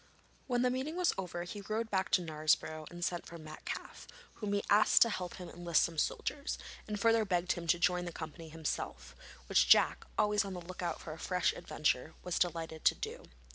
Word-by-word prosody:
When 245 -2 +1
the 250 - +3
meeting 265 +6 -2
was 360 -1 +2
over 175 -2 -4
he 200 +4 -7
rode 220 +3 -2
back 190 -1 +1
to 180 - +5
Knaresborough 155 0 0
and 175 0 -4
sent 175 -1 -2
for 170 - -9
Metcalfe, 155 -1 -7 0.3
whom 210 -2 -3
he 200 - +1
asked 210 +1 +6
to 230 - -1
help 180 -3 -4
him 180 - -8
enlist 170 -1 +2
some 165 -2 -1
soldiers, 285 - -1 0.3
and 210 -1 -3
further 225 +1 +4
begged 180 -3 +1
him 170 -1 -3
to 175 - +4
join 180 +1 +2
the 175 - -4
company 160 0 -7
himself, 65 - -4 0.3
which - - +4
Jack, - - +6
always 210 0 +3
on 195 -1 -5
the - - -4
look 180 +2 -8
out 170 -2 -2
for 155 - -7
a 160 - -11
fresh 180 +1 +1
adventure, 150 0 -1
was 180 -1 -1
delighted 165 -2 -1
to - - +6
do. - - -6
175 Hz, 210 wpm, -33 LUFS, 165-205 Hz, 0.3 s, asked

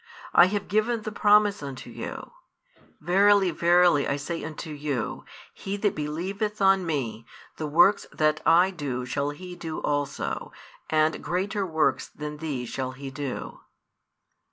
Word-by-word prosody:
I 175 - +8
have 200 +1 -2
given 215 +2 0
the 215 - -4
promise 210 -1 +4
unto 140 -2 -7
you: - - -7 0.7
Verily, 195 +3 +4
verily 170 -3 +4
I 140 - 0
say 160 +4 -4
unto 155 +1 -6
you, 145 -4 -3 0.3
He 200 +1 -5
that 205 0 +1
believeth 190 +8 -3
on 195 -2 +4
Me, 125 -8 -2 0.3
the 155 - -3
works 175 +7 +4
that 155 0 +1
I 175 +4 +5
do 135 -8 -4
shall 140 +3 -1
he 180 +4 -8
do 165 -2 -6
also; 145 -1 -2 0.4
and 155 0 +1
greater 195 +2 -1
works 160 -2 +1
than 150 0 -7
these 145 -6 -4
shall 130 +1 -4
he 135 +1 -8
do. 140 -1 -5
160 Hz, 145 wpm, -26 LUFS, 145-195 Hz, 0.7 s, I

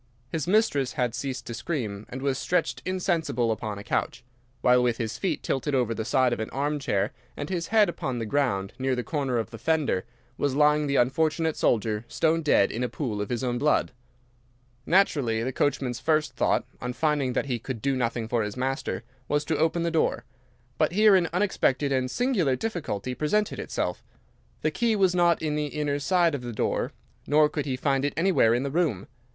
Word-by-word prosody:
His 160 +2 -3
mistress 185 - +2
had 125 -3 0
ceased 130 0 -4
to 120 - -6
scream 115 -6 -4
and 130 +1 -6
was 135 -2 0
stretched 130 -8 0
insensible 170 - 0
upon 110 -2 -3
a 100 - -8
couch, 120 +2 -2 0.4
while 125 0 +5
with 120 -2 +1
his 110 -2 -4
feet 190 - -1
tilted 135 +1 -1
over 120 -3 +1
the 110 - -3
side 130 +1 +2
of - - -3
an 110 - -3
armchair, 140 -8 -1 0.2
and 145 +4 -5
his 170 -2 -2
head 220 -2 +4
upon 135 -7 -3
the 115 - -2
ground 105 -6 0
near 130 0 +1
the 125 - -2
corner 135 -5 -1
of 110 -4 -2
the 115 - -9
fender, 150 -8 +1 0.4
was 140 -2 0
lying 150 0 +4
the 140 - 0
unfortunate 155 +5 +2
soldier 110 -1 +1
stone 165 0 +1
dead 150 -10 +3
in 120 - -2
a 125 - -1
pool 110 -8 -3
of 105 - -4
his 120 +1 -2
own 120 -1 -1
blood. 150 -1 +2 1.0
"Naturally, 140 - +2
the 130 +2 -2
coachman's 130 -4 0
first 155 +1 +1
thought, - - +1 0.2
on 125 0 -3
finding 145 -3 0
that - - 0
he 125 -4 -2
could 120 0 -5
do 135 +3 0
nothing 115 -2 -1
for 115 0 0
his 105 +2 -4
master, 130 -1 -2 0.2
was 145 0 0
to 155 - 0
open 165 +2 +1
the 170 - 0
door. 160 - 0 0.5
But - - +2
here 210 0 +6
an 175 -3 +2
unexpected 165 -7 +1
and 130 -1 +1
singular 195 - +1
difficulty 130 - -3
presented 200 +10 0
itself. - - -3 0.6
The - - +2
key 235 -2 +1
was 190 -3 +3
not 175 -2 +3
in 155 -1 0
the 150 0 -1
inner 145 -1 -2
side 175 +1 +2
of 140 - -3
the 120 -1 -6
door, - - -1 0.4
nor 150 +1 +5
could 150 -1 -4
he 130 - 0
find 135 0 +1
it 145 - 0
anywhere 165 -10 +4
in 125 - 0
the 140 - -3
room. 150 - 0
140 Hz, 200 wpm, -26 LUFS, 120-160 Hz, 1.0 s, here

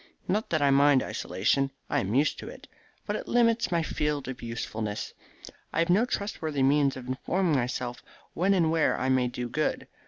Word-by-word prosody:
Not 210 +4 0
that 155 -3 +1
I 140 - +4
mind 140 -1 +5
isolation: 125 +9 0 0.2
I - - +1
am 100 +4 -2
used 145 +3 +2
to - - -7
it. - - -12 0.4
But - - -2
it - - -5
limits 230 -2 +2
my 170 -1 +1
field 150 -3 -2
of 130 -1 -6
usefulness. 110 -2 -4 0.6
I - - -5
have 165 +1 +2
no 210 +7 +4
trustworthy 160 - -2
means 140 0 +3
of 125 -1 -9
informing 165 +6 0
myself 125 -1 -2 0.3
when 195 +3 +2
and 165 -4 +2
where 165 -1 +2
I 130 - 0
may 130 -1 +3
do 125 0 -4
good. 155 +6 -2
140 Hz, 190 wpm, -28 LUFS, 125-170 Hz, 0.6 s, mind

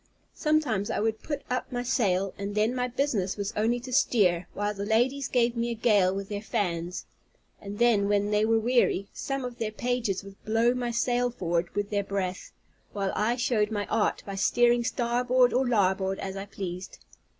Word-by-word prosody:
Sometimes 295 - 0
I - - -1
would 220 0 -1
put 290 -2 -4
up 250 0 -3
my 245 -1 -2
sail 195 -6 +1
and 200 +1 -5
then 215 +3 +2
my 250 -1 -1
business 235 -8 -1
was 200 0 -3
only 230 +3 +1
to 255 +1 -7
steer, 190 -10 +3
while 205 +1 -1
the 200 -1 -5
ladies 245 +6 +1
gave 240 -1 +1
me 235 0 -1
a 235 - -2
gale 210 -5 +3
with 195 0 -4
their 205 0 -4
fans; 180 -4 -2 0.6
and 200 0 -7 0.3
when 205 0 +1
they 210 0 +3
were 225 +1 +3
weary, 225 -4 +2
some 275 -1 -3
of 245 -1 -7
their 220 -1 -2
pages 240 -4 -1
would 195 0 -14
blow 225 +2 +2
my 250 -1 -2
sail 245 +1 +1
forward 175 -6 -1
with 205 0 -2
their 205 -1 +1
breath, 190 -2 -3 0.4
while 195 -2 -1
I 225 +3 +1
showed 235 -4 +1
my 205 -2 -2
art 220 -1 +1
by 200 - -6
steering 240 +4 +3
starboard 245 0 +2
or 255 +1 +2
larboard 190 -4 +1
as 190 0 -5
I 195 +1 -6
pleased. 185 -2 -6
215 Hz, 190 wpm, -27 LUFS, 195-245 Hz, 0.6 s, steer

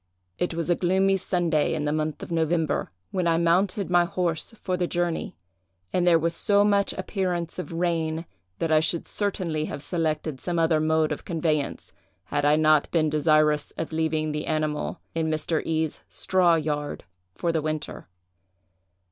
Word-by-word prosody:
"It 175 -2 -1
was 165 -1 -2
a - - +4
gloomy 190 +2 +2
Sunday, 175 -5 +1
in 150 - -2
the 150 - 0
month 155 0 -2
of - - -8
November, 165 -1 0 0.2
when 185 -2 0
I 165 -1 +3
mounted 180 +3 +1
my 175 0 +5
horse 175 -3 -2
for 185 - 0
the 180 -1 -1
journey, 175 -1 -2 0.6
and 180 -1 +2
there 170 -1 +6
was 165 +1 0
so 205 0 +3
much 200 -1 +2
appearance 185 -3 -2
of 180 - -5
rain, 165 -1 -1 0.3
that 165 - -1
I 155 - +6
should 160 +1 -1
certainly 175 -7 -2
have 145 - -6
selected 155 -4 -2
some 175 -1 -2
other 165 -1 +3
mode 160 0 +2
of - - -4
conveyance, 155 -3 -2 0.3
had 145 +8 -1
I 145 +1 +5
not 155 -1 +4
been 155 -3 +1
desirous 150 -1 +3
of 165 - -4
leaving 155 -1 0
the 150 0 -4
animal 155 -1 -1
in 160 -1 0
Mr. 155 +1 0
E——'s 160 -1 -1
straw 180 -3 +3
yard 150 -2 -2 0.3
for 170 - 0
the 160 -1 0
winter. 155 0 -4
165 Hz, 170 wpm, -25 LUFS, 155-175 Hz, 0.6 s, there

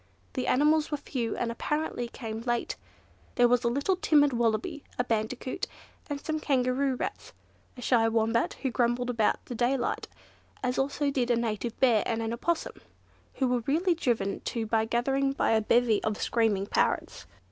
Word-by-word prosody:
The 255 - -2
animals 300 +3 +3
were 295 - -1
few, 245 -5 -3
and 235 - -1
apparently 300 0 -2
came 225 -2 -6
late. 240 0 -1 0.6
There 245 -1 +5
was 245 +1 +2
a - - +2
little 280 +10 +1
timid 290 -6 +4
Wallaby, 235 +4 0
a 245 - +2
Bandicoot, 230 +2 -2 0.6
some 310 -1 -2
Kangaroo 265 -1 +1
Rats, - - -5 0.4
a 245 - -8
shy 230 -3 +3
Wombat 225 +1 +1
who 265 - 0
grumbled 240 +1 +1
about 225 -3 +1
the - - -6
daylight, 245 +2 0 0.6
as 250 0 0
also 280 +1 0
did 250 -3 0
a 240 - +4
Native 230 0 -2
Bear 235 -5 +4
and 225 - -1
an 225 +1 -2
Opossum, 325 +7 -2 0.5
who 265 - +1
were 250 0 +1
really 340 +6 +2
driven 230 -10 -1
to 230 -2 -3
the 220 0 +1
gathering 270 +4 +1
by - - +1
a 220 -1 +4
bevy 230 0 +3
of 215 -1 -1
screaming 220 -4 +1
parrots. - - -1
245 Hz, 170 wpm, -28 LUFS, 225-270 Hz, 0.6 s, There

